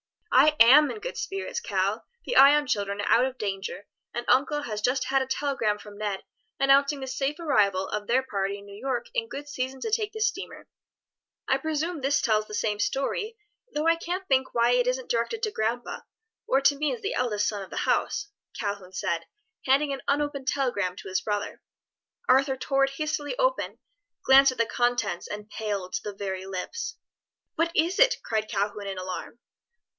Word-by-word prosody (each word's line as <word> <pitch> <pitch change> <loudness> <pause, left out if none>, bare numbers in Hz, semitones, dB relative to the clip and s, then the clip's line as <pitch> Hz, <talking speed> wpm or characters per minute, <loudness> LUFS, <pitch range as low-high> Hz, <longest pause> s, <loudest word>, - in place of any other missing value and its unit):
"I 300 +4 +6
am 280 +6 +8
in 435 - -5
good - - -6
spirits, 390 0 -3
Cal, - - -1 0.2
the - - -2
Ion 290 +2 +7
children 200 -4 -1
are - - -3
out 245 +2 +5
of 260 0 -4
danger, 195 -1 -4 0.3
and 240 0 -4
uncle 295 +3 +2
has 215 -6 -4
just 255 +4 +1
had 270 0 +1
a 265 - -2
telegram 265 -6 0
from 205 0 -12
Ned 205 -2 -3 0.4
announcing 275 +1 +4
the - - -3
safe 270 +3 -2
arrival 200 - +2
of 210 -1 -4
their 255 +2 +3
party 200 -4 -2
in 200 - -13
New 200 0 -11
York 260 - -3
in 470 -2 -1
good 290 -7 -7
season 265 -2 -4
to 445 - -3
take 425 -1 0
the 440 - -6
steamer." 460 +3 -2 0.8
"I - - +2
presume 315 +1 -2
this 275 +1 +2
tells 215 -2 +1
the 210 - -6
same 210 -1 -1
story, 420 - -1 0.4
though 300 +1 0
I 330 - +5
can't 360 +3 -4
think 265 -2 +1
why 235 +1 +4
it 245 0 +3
isn't 255 0 -1
directed 245 - -1
to 430 - +1
grandpa, 235 - -2 0.5
or 270 - +3
to 285 +1 +4
me 300 +1 0
as 465 - -14
the 405 - -2
eldest 210 -4 0
son 205 -2 -2
of 190 - -8
the - - -7
house," 410 - 0 0.3
Calhoun 200 -3 -4
said, 170 -4 -2 0.4
handing 280 +2 +3
an 270 - -5
unopened 280 -1 -1
telegram 240 -11 0
to 190 - -9
his 185 0 0
brother. 205 0 -3 0.7
Arthur 265 0 +4
tore 275 +1 +2
it 270 - -5
hastily 305 - -3
open, - - 0 0.5
glanced 270 0 +7
at - - -15
the 230 - +3
contents 240 -7 0
and 210 +1 -7
paled 200 -4 -3
to - - -1
the 205 -1 -5
very 190 -1 -4
lips. 450 - -4 0.6
"What 335 +1 +1
is 345 +6 +2
it?" - - +6
cried 215 -1 -1
Calhoun 205 -1 -2
in 195 -1 -4
alarm. 185 +4 -6
260 Hz, 195 wpm, -27 LUFS, 210-295 Hz, 0.8 s, am